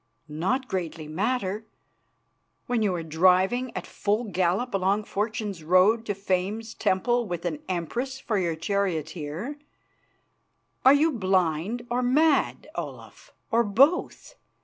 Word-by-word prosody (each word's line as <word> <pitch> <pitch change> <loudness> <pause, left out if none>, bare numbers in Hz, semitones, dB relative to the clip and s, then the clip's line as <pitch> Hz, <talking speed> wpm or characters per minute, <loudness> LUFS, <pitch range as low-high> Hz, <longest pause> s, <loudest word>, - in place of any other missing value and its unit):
"Not 190 - -1
greatly 165 -5 -4
matter, 210 +4 -2 1.0
when 245 -2 0
you 200 -4 +1
are 170 - -3
driving 185 +10 +3
at - - -4
full 210 +3 -1
gallop 195 +4 0
along 195 +2 +1
Fortune's 210 -4 -3
road 190 +7 +4
to 205 - -1
Fame's 200 +4 -2
temple 240 +6 +1
with 175 -1 -4
an 160 -4 -2
Empress 240 - -3
for 220 -6 -1
your 170 -3 0
charioteer! 170 - -3 1.2
Are 265 +2 +8
you 315 +3 +3
blind 190 - 0
or 245 +1 +1
mad, 285 +4 +2
Olaf, - - -8 0.2
or 235 +1 +4
both? 270 - +2
200 Hz, 125 wpm, -26 LUFS, 180-240 Hz, 1.2 s, Are